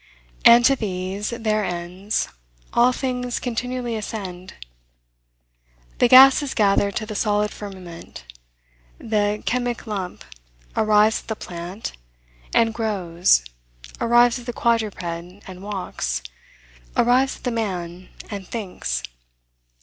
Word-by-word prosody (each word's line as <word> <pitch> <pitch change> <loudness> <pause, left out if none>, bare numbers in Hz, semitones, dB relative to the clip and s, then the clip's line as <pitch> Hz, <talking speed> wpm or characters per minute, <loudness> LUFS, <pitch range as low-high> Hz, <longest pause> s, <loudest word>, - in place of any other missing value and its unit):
And 235 +1 +8
to 275 - +5
these, 195 -2 -3
their 220 -3 0
ends, 180 +3 -2 0.5
all 240 +1 +5
things 250 -1 -2
continually 245 0 -3
ascend. 190 -4 -6 1.4
The - - +5
gases 270 +3 +7
gather 200 -1 +3
to 215 +2 -4
the 215 - -6
solid 210 0 +1
firmament; 185 - -9 0.7
the 210 -1 -1
chemic 245 -1 -1
lump 195 -5 -5 0.5
arrives 215 +1 +4
at - - -24
the 220 - -2
plant, 180 +3 -6 0.6
and 225 -1 +3
grows; 180 - +2 0.5
arrives 240 +1 +4
at 240 - -13
the 245 - -3
quadruped, 225 -6 0
and 180 +2 -7
walks; 180 - -3 0.7
arrives 255 +3 +3
at - - -22
the 250 - -1
man, 185 -5 -4 0.2
and 200 -3 -6
thinks. 180 - -4
210 Hz, 110 wpm, -22 LUFS, 185-235 Hz, 1.4 s, And